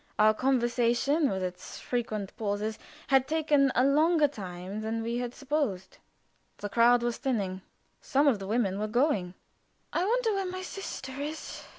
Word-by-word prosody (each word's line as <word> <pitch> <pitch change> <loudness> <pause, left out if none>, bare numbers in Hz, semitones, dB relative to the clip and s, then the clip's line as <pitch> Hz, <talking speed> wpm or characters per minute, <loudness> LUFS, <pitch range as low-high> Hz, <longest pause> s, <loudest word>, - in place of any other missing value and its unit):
Our 215 +1 +6
conversation, 250 +4 +2
with 190 -1 -2
its 180 0 -6
frequent 215 -5 -3
pauses, 210 0 -2 0.3
had 265 -1 +4
taken 295 -3 +3
a 255 - +4
longer 305 +2 +4
time 190 -4 -7
than 225 +1 -2
we 235 +1 -2
had 245 0 -4
supposed. 275 -10 -2 0.6
The 205 - -5
crowd 235 +2 +4
was 240 -1 -1
thinning. 200 -8 -2 0.4
Some 285 +1 +2
of 240 -7 +3
the 195 - -6
women 205 -3 0
were 215 - -1
going. 215 - +1 0.6
"I 345 - +1
wonder 455 +2 +1
where 390 -1 -1
my 370 0 -5
sister 365 -8 -6
is!" 305 +2 -6
240 Hz, 160 wpm, -29 LUFS, 210-290 Hz, 0.6 s, Our